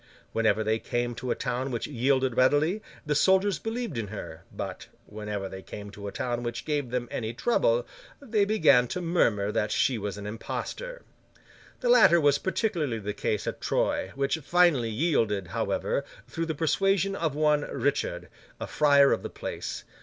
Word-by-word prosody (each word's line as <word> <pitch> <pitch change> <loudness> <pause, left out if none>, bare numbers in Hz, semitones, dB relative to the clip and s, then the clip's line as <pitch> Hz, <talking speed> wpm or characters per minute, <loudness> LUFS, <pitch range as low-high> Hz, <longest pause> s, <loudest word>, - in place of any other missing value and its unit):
Whenever 110 -1 +2
they 110 +1 +1
came 120 +1 -2
to 120 +2 -6
a - - +1
town 125 +2 -2
which 120 -3 -3
yielded 130 -1 +1
readily, 145 - +3 0.2
the 150 - +1
soldiers 190 +4 +3
believed 225 - -3
in 110 - -3
her; 90 -5 -8
but, - - -6 0.2
whenever 105 -2 -5
they 95 0 -8
came 105 +1 -9
to 100 0 -8
a - - -4
town 120 +2 -2
which 120 0 -4
gave 145 -4 -1
them 120 0 -2
any 110 -1 -3
trouble, - - +2 0.3
they 220 -7 +1
began 155 - +4
to 180 - -3
murmur 115 - +1
that 105 0 0
she 125 -4 +2
was 100 0 -4
an 105 - -7
impostor. - - -5 0.8
The 245 - 0
latter 220 -8 +7
was 145 -2 +3
particularly 175 - -1
the 105 -1 -4
case 105 0 -2
at - - -4
Troyes, 95 - 0
which 140 +3 0
finally 160 -6 +3
yielded, 110 - 0
however, - - -1 0.2
through 165 0 -3
the 160 - -2
persuasion 195 +5 +1
of 160 -6 -1
one 150 -1 +3
Richard, 145 0 -1 0.3
a - - -3
friar 140 -2 +5
of - - +1
the - - -5
place. - - -5
135 Hz, 175 wpm, -27 LUFS, 110-170 Hz, 0.8 s, latter